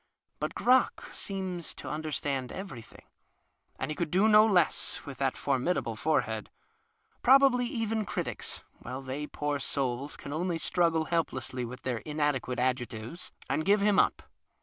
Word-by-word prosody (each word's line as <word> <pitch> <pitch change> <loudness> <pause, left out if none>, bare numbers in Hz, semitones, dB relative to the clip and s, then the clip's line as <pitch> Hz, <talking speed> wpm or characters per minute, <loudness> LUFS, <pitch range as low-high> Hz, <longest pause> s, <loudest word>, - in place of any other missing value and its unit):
Cut - - -3
Crock 255 +1 +3
seems 185 -4 -4
to - - -7
under 155 0 -3
stand 135 -3 -2
everything 165 - -8 0.8
(he 155 - -2
could 160 +1 -2
do 190 +6 +4
no 215 0 +7
less, 180 -6 +2
with 140 -3 -8
tluit 135 0 0
noble 115 - -2
forehead), 110 -5 0 0.7
probably 260 -1 +6
even 225 -2 -1
critics, - - -4 0.2
while 130 +2 -6
tiiey, 140 +3 -5
poor 145 -1 -1
souls, 135 0 -2
can 140 - -7
only 170 +2 -1
struggle 165 -1 +2
helplessly 160 -6 -1
witli 125 +2 -8
their 125 -2 -1
inadequate 145 -4 -1
adjectives, 125 +3 -2 0.2
and 155 - 0
give 200 +3 +4
him 205 -1 +4
up. - - +2
150 Hz, 145 wpm, -30 LUFS, 130-190 Hz, 0.8 s, no